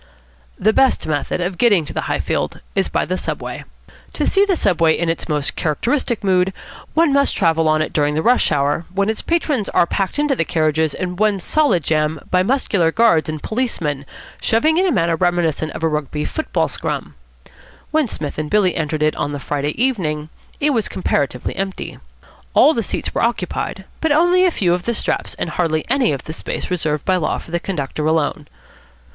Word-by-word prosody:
The 215 +3 +2
best 265 +2 +3
method 150 +3 -1
of 180 0 -3
getting 205 -10 +4
to - - -8
the - - -3
Highfield - - -1
is - - +1
by - - 0
the - - -2
Subway. - - -5 0.5
To - - -1
see 395 0 +4
the 390 -2 +1
Subway 165 - +2
in 170 -1 0
its 165 - -3
most 150 -2 -1
characteristic 235 - -1
mood 190 -1 +2 0.4
one 320 -3 +4
must 280 0 +2
travel 160 -1 +2
on 155 0 +3
it - - -6
during 150 -1 +1
the 160 - 0
rush 245 -6 +3
hour, 145 +3 +1
when 200 +2 0
its 220 - -1
patrons 300 - 0
are - - +3
packed 195 +5 -2
into 295 -2 +2
the 165 - +1
carriages 155 -2 +1
in 180 -1 -4
one 210 -1 +2
solid 265 - +2
jam 155 +1 0
by 180 - +4
muscular 195 -7 +1
guards 170 -7 +3
and 155 -1 -5
policemen, 160 - -2 0.3
shoving 310 +9 +2
in 380 - +3
a - - +2
manner 170 -6 +2
reminiscent 165 -3 0
of - - -7
a - - +4
Rugby 150 -1 -2
football 315 - -1
scrum. - - -4 0.8
When 310 -3 +2
Psmith 150 -8 -5
and 155 -1 -3
Billy 200 -4 +3
entered 155 -1 -1
it 155 - +2
on 145 - -2
the 145 - -4
Friday 145 +4 -3
evening, 160 -12 0 0.3
it 295 0 +2
was 225 -5 0
comparatively 140 -8 -1
empty. 195 0 -4 0.6
All 310 - +6
the 230 - 0
seats 210 - -3
were - - 0
occupied, 190 -4 -2
but 320 - 0
only 350 +4 +4
a - - +5
few 180 - +1
of 175 0 -2
the 235 - 0
straps - - -1
and 170 - -3
hardly 155 -2 0
any 265 -3 +3
of 135 -3 -3
the 155 - -6
space 165 - -5
reserved 155 -4 -1
by 185 -1 +3
law 165 - -1
for - - -11
the 170 - 0
conductor 155 -5 -3
alone. 155 -2 0
175 Hz, 200 wpm, -19 LUFS, 155-230 Hz, 0.8 s, All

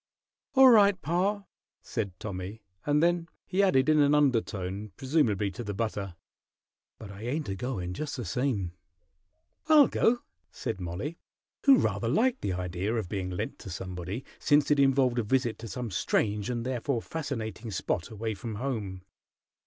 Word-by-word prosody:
"All 265 -1 +9
right, 200 -4 +6
pa," 190 +6 0 0.4
said 100 -7 -4
Tommy; 100 +2 -6 0.2
and 150 +1 +3
then 170 -1 +2 0.2
he 190 - +1
added 140 -9 +4
in 155 0 +5
an 145 0 +5
undertone, 105 -8 0
presumably 120 - +1
to 95 - -6
the 105 -2 -4
butter, 100 -4 -3 0.8
"But 105 -3 -9
I 100 +1 -10
ain't 130 +2 -2
a 95 - -2
goin', 95 -5 -3
just 145 +8 -4
the 120 - -4
same." 105 -4 -1 1.0
"I'll 305 -3 +8
go," 240 +1 +2 0.3
said 95 - -5
Mollie, 95 - -4 0.5
who 275 -2 +8
rather 115 - 0
liked 245 - +2
the 95 - -1
idea 90 +4 -2
of 110 -6 -2
being 95 -2 -3
lent 90 - -4
to - - -9
somebody, 90 +5 -5
since 145 0 +3
it 145 - +4
involved 135 -3 +3
a - - +1
visit 120 +1 0
to 115 - -7
some 115 +2 -5
strange 105 +3 0
and 120 -1 -2
therefore 125 -1 -1
fascinating 120 -7 -4
spot 90 -3 -2
away 110 0 -3
from 110 +2 -6
home. 105 -7 -4
115 Hz, 160 wpm, -29 LUFS, 100-145 Hz, 1.0 s, All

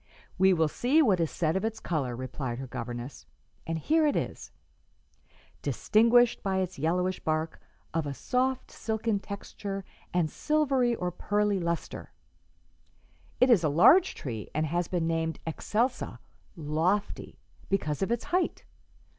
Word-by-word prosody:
"We 190 +1 +6
will 160 -3 +3
see 265 - +3
what 200 -9 +3
is 165 -2 +1
said 160 -1 0
of 190 - 0
its 220 0 -2
color," 140 - -2
replied 130 0 -4
her 135 - -5
governess, 120 +1 -7 0.4
"and 165 0 -1
here 310 - +2
it 290 - +1
is: - - -3 1.1
'Distinguished 235 +2 +3
by 190 -1 -1
its 185 -5 -2
yellowish 180 +4 0
bark, 155 +1 -2 0.3
of 160 -2 -1
a 140 - -3
soft 255 - -1
silken 220 -1 -1
texture 200 -1 -6 0.3
and 175 -3 +2
silvery 270 - +1
or 180 -4 -2
pearly 205 +2 0
lustre,' 170 -1 -4 1.3
It 255 0 +5
is 200 -8 +5
a 155 - +3
large 325 - +6
tree, 115 -7 -6
and 155 +1 +1
has 170 +2 -1
been 175 -3 -1
named 165 0 -1
excelsa 225 - -1 0.4
'lofty' 165 +6 -1 0.3
because 155 -6 -1
of 195 - 0
its 235 - 0
height. 365 0 -1
180 Hz, 145 wpm, -29 LUFS, 155-225 Hz, 1.3 s, We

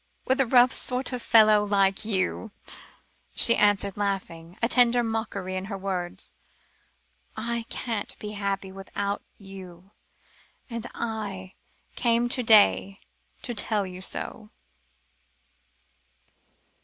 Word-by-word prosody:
"With 265 +1 +2
a 265 - +1
rough 250 +1 +5
sort 255 0 -1
of 250 - -3
fellow 215 -2 +6
like 195 -1 +1
you," 210 +1 -1 0.9
she 235 - +6
answered, 205 -1 +2
laughing, 185 -4 -4
a 230 - +1
tender 245 -1 +4
mockery 220 -4 -3
in 185 0 -3
her 200 -1 -5
words. 185 -2 -3 1.0
"I 235 +1 -3
can't 225 -4 -4
be 210 - -7
happy 200 -2 -3
without 200 +1 -4 0.2
you, 190 -2 -12 0.8
and 230 0 -4
I 200 -5 -5 0.4
came 235 0 +1
to 250 0 +2
day, 205 -3 +4 0.4
to 245 - -3
tell 210 -2 -1
you 185 0 -9
so!" 210 +3 -4
205 Hz, 115 wpm, -26 LUFS, 195-230 Hz, 1.0 s, fellow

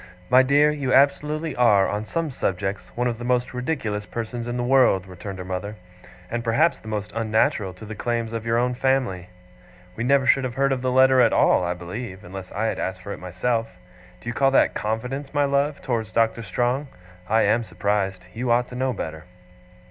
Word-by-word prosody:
'My 130 +1 +8
dear, 145 +3 +4
you 140 -3 -2
absolutely 150 +3 +2
are, 105 -6 +4
on 105 +1 -3
some 165 +5 -2
subjects, 95 -3 -3
one 125 - +1
of 120 -2 -1
the - - -6
most 125 +1 0
ridiculous 125 -6 -2
persons 120 +1 -5
in 120 0 -3
the 120 - -1
world,' 125 -7 +4
returned 95 +1 -8
her 90 - -7
mother, 95 +3 -4 0.6
'and 120 0 -2
perhaps 135 +9 +2
the - - -15
most 105 -1 -4
unnatural 110 -3 +1
to 100 - -11
the 110 - -7
claims 115 0 -2
of 115 -1 -3
your 115 0 +1
own 125 +1 +1
family. 125 -9 0 0.7
We 110 - -3
never 135 +1 +3
should 135 +1 +4
have 130 -1 -4
heard 135 +1 +2
of 130 -2 -1
the 130 0 0
letter 130 0 +5
at - - +4
all, - - +4
I 90 0 -1
believe, 95 +3 -7
unless 95 0 -9
I 105 +3 -2
had - - -1
asked 95 -1 -4
for 100 - -5
it - - -9
myself. 115 +6 -1 0.5
Do - - -13
you 120 - -2
call 135 +3 +3
that 135 - +3
confidence, 125 +7 -3
my 145 0 +3
love, 140 +1 0
towards 115 -4 -2
Doctor 115 +1 +1
Strong? 125 +5 -1 0.4
I 110 +1 +4
am 120 +1 +2
surprised. 100 -3 -2
You 120 +2 -3
ought 120 +1 +2
to 125 - -9
know 130 0 0
better. 80 -5 -6
120 Hz, 210 wpm, -23 LUFS, 105-130 Hz, 0.7 s, My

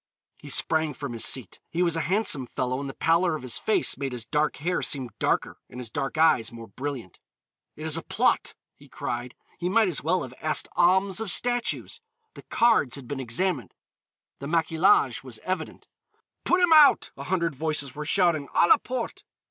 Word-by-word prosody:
He - - -11
sprang 155 -3 +1
from 140 -3 -6
his 115 - 0
seat. 125 -8 0
He 175 +2 0
was 170 -2 +1
a 165 - -1
handsome 160 - +1
fellow 130 +1 -2
and 140 -1 -5
the 135 - -9
pallor 165 +1 +2
of 155 - -7
his 125 -3 -2
face 215 - +1
made 135 -2 -3
his 120 -2 -5
dark 150 +3 0
hair 175 +5 -2
seem 130 -4 -1
darker - - -1
and 125 - -10
his 120 -3 -7
dark 140 +4 -3
eyes 155 -8 +3
more 115 -1 -10
brilliant. 130 -3 -6 0.6
"It 155 - -8
is 160 0 +2
a - - -3
plot," - - 0 0.2
he - - -19
cried. 120 +1 -5 0.2
He 180 - -1
might 220 +2 +3
as 165 - -2
well 180 +4 +1
have 125 - -9
asked 155 - -1
alms 190 +2 +3
of 225 -2 -4
statues. 245 - 0 0.3
The - - -11
cards 225 - +2
had 135 -4 -10
been 140 +1 -5
examined, 130 - -2 0.6
the 140 - -6
maquillage 165 - +2
was - - -7
evident. - - -4 0.6
"Put 360 +1 +3
him 350 -2 +5
out!" 300 -3 +6
a 140 - -8
hundred 170 -2 0
voices 145 -1 -2
were 150 - -6
shouting; 160 -3 +2
"_à 170 - +4
la - - +8
porte! 250 -2 -5
155 Hz, 195 wpm, -26 LUFS, 130-180 Hz, 0.6 s, la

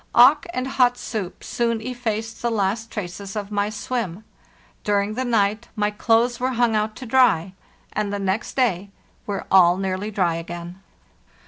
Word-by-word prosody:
Auk 275 +6 +7
and 255 -6 -2
hot 250 -2 +3
soup 205 -7 -5
soon 230 -1 0
effaced 225 -2 -4
the 235 - +1
last 220 +1 -1
traces 195 -1 -6
of 205 -1 -4
my 205 0 0
swim. 215 -3 -3 0.6
During 205 0 +1
the 255 +4 -2
night 220 -2 +1
my 210 -1 +1
clothes 230 +3 +2
were 255 +1 0
hung 235 -2 +2
out 215 0 0
to 255 - -8
dry, 225 -8 +3 0.4
and 210 -1 -1
the 205 - -1
next 195 +2 -2
day 200 -7 +1 0.4
were 200 -1 -3
all 180 -2 +6
nearly 190 +2 -2
dry 180 -5 +1
again. 175 +2 -7
215 Hz, 160 wpm, -23 LUFS, 195-240 Hz, 0.6 s, Auk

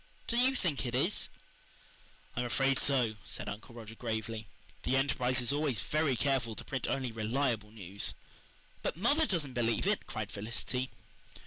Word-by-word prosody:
Do 235 - -1
YOU 255 +3 +5
think 170 - 0
it 120 -1 -2
is?" 170 +11 +2 1.1
"I'm 125 - +1
afraid 135 +2 +3
so," 125 -6 +3
said - - -5
Uncle 105 +3 -6
Roger 115 -2 -8
gravely. 110 -2 -3 0.3
"The 130 - +1
Enterprise 130 -1 +2
is 120 +3 +2
always 145 -7 +2
very 150 +3 +2
careful 120 -3 +1
to - - -8
print 130 - -2
only 130 -3 0
reliable 115 0 0
news." 100 -2 -3 0.7
"But - - -1
mother 285 - +4
doesn't 155 -8 +1
believe 115 +2 +1
it," 205 +1 +1
cried 110 -3 -4
Felicity. 120 +5 -2
125 Hz, 155 wpm, -33 LUFS, 115-140 Hz, 1.1 s, YOU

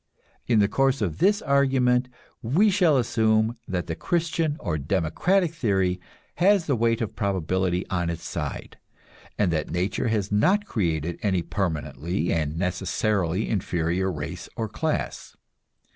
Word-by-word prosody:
In 120 - +3
the 100 -1 +4
course 135 +3 +1
of 85 -4 -3
this 205 +1 +3
argument 130 -3 +2 0.3
we 175 - +3
shall 180 -7 +4
assume 110 -1 +2
that 90 -2 -2
the 80 - -3
Christian 165 - -1
or 80 -5 -2
democratic 100 - +1
theory 95 - 0 0.4
has 190 -1 +4
the 140 - +1
weight 115 0 +1
of 110 - -3
probability 95 -2 0
on 85 -2 -1
its 85 - -5
side, - - -5 0.6
and 100 -4 +2
that 80 -2 -1
nature 90 +7 -1
has 105 -3 -1
not 185 - +3
created 85 - -2
any 95 -4 +1
permanently 80 -2 -2
and 75 -1 -1
necessarily 95 +1 0
inferior 90 -2 -1
race 80 +3 -6
or 115 -2 -2
class. 155 +9 -3
100 Hz, 140 wpm, -25 LUFS, 90-130 Hz, 0.6 s, the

